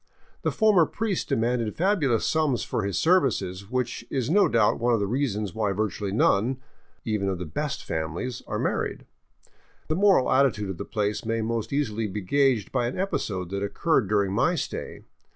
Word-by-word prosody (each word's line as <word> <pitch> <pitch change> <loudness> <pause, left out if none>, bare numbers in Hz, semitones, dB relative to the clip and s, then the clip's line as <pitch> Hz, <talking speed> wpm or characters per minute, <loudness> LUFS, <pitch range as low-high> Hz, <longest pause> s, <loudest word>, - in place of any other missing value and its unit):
The - - 0
former 205 -8 +4
priest 215 -4 -2
demanded 115 -1 0
fabulous 160 - +1
sums 155 -6 +1
for - - -2
his 100 -2 -2
services, 100 - +1
which 125 -1 -2
is 130 +1 -1
no 205 +3 +5
doubt 110 -3 +2
one 120 +1 +2
of - - +1
several 100 -1 -2
reasons 110 -8 -1
why 105 -3 0
virtually 100 -1 -2
none, 115 +4 +2 0.5
even 105 -3 0
of 95 - -2
the 90 - -5
'*best 145 - -3
families," 85 +10 -4
are - - -2
married. - - -2 0.8
The 155 - +1
moral 195 -7 +4
attitude 115 -8 +2
of 90 - -8
the - - -4
place 105 0 -2
may 115 0 -1
most 115 -1 -2
easily 115 -6 -1
be 105 +1 -4
gaged 130 +1 +1
by 125 -2 0
an 125 - -4
episode 95 - -2
that 100 0 -2
occurred 105 - +1
during 100 -2 +1
my 165 - +2
stay. 160 - -5
115 Hz, 180 wpm, -26 LUFS, 100-140 Hz, 0.8 s, no